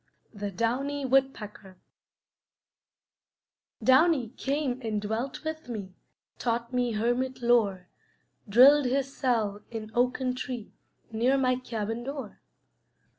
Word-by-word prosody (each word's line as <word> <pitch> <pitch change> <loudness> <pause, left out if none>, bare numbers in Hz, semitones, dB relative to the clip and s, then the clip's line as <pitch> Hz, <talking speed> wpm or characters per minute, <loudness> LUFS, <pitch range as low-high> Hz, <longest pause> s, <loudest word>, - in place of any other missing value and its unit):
THE 205 -1 -4
DOWNY 260 +8 -1
WOODPECKER 225 -8 -1 2.1
Downy 265 -2 +4
came 270 0 -2
and 220 -3 -2
dwelt 220 +8 -3
with 315 -4 -5
me, 200 -5 -6 0.5
Taught 235 +1 -2
me 245 -2 +1
hermit 245 +4 -1
lore; 205 -7 +2 0.6
Drilled 270 +7 +7
his 270 +2 -1
cell 220 -6 0
in 220 -2 -6
oaken 250 +1 +1
tree 250 -4 -6 0.4
Near 240 +5 +2
my 255 -1 +2
cabin 225 -2 -4
door. 270 -4 -6
245 Hz, 105 wpm, -28 LUFS, 220-265 Hz, 2.1 s, Drilled